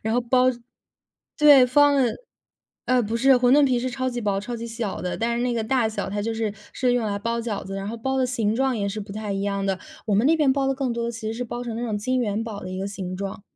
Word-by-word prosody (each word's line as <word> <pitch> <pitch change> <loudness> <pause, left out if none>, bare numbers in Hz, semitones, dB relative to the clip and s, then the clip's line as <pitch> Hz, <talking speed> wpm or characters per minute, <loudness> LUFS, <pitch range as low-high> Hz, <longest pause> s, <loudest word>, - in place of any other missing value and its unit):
然 220 +1 -1
后 245 - +3
包 250 +1 +3 0.9
对， 290 -4 +8
方 290 +3 +5
的， 255 -4 +2 0.7
呃， 255 -1 +3
不 220 +1 -2
是 265 +3 +5
馄 250 0 +4
饨 290 +1 +6
皮 255 -2 +2
是 250 +2 -2
超 260 0 -2
级 240 -1 -4
薄、 200 -3 0
超 235 +4 -5
级 230 0 -6
小 230 -3 -4
的， 180 - -3
但 235 +1 -1
是 240 - -1
那 245 -1 0
个 230 - -1
大 235 0 +1
小 210 -2 -4
它 205 +1 -2
就 225 +2 -2
是 220 -2 -2 0.2
是 250 -1 +1
用 245 -2 +1
来 200 -1 -2
包 230 +3 -2
饺 225 -3 -3
子， 195 +1 -6
然 195 0 -4
后 230 - -5
包 265 +4 -2
的 260 - +2
形 225 -4 0
状 265 +1 +1
也 200 -2 -1
是 205 +2 -4
不 200 -1 -8
太 210 -1 -4
一 195 0 -2
样 200 -1 -1
的， 195 -1 0 0.3
我 210 - +1
们 215 +6 +3
那 325 +2 +4
边 295 -4 +3
包 275 0 0
的 270 - +1
更 265 -2 -2
多 235 0 -2
的 235 - -2
其 225 - -8
实 - - -2
是 245 +2 -3
包 240 +1 -5
成 235 -2 -5
那 235 - -4
种 220 -3 -2
金 255 +5 -1
元 220 -3 -1
宝 220 -3 -6
的 185 - -7
一 185 - -5
个 195 - -3
形 185 -2 -5
状。 195 +1 -5
230 Hz, 320 characters per minute, -24 LUFS, 205-255 Hz, 0.9 s, 对